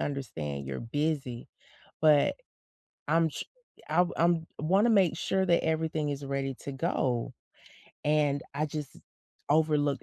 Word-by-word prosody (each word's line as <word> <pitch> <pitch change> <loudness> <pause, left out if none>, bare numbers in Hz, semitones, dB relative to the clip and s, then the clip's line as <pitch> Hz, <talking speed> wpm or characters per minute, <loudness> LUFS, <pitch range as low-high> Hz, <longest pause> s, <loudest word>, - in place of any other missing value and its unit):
understand 80 - -4
you're 65 -1 -4
busy, 135 -1 -2 0.6
but 150 -2 +5 0.7
I'm 165 +1 +3
tr - - -5 0.4
I've 175 +3 +2
I'm 170 -1 +2
wanna 190 +10 +3
make 190 -7 +4
sure 190 +2 0
that 170 -1 +3
everything 160 -2 0
is 140 0 -4
ready 135 -1 -2
to 140 - -5
go, 130 -5 -1 0.7
and 145 -2 +2
I 150 +2 0
just 150 -1 -6 0.5
overlooked 150 -2 +2
150 Hz, 125 wpm, -29 LUFS, 140-160 Hz, 0.7 s, but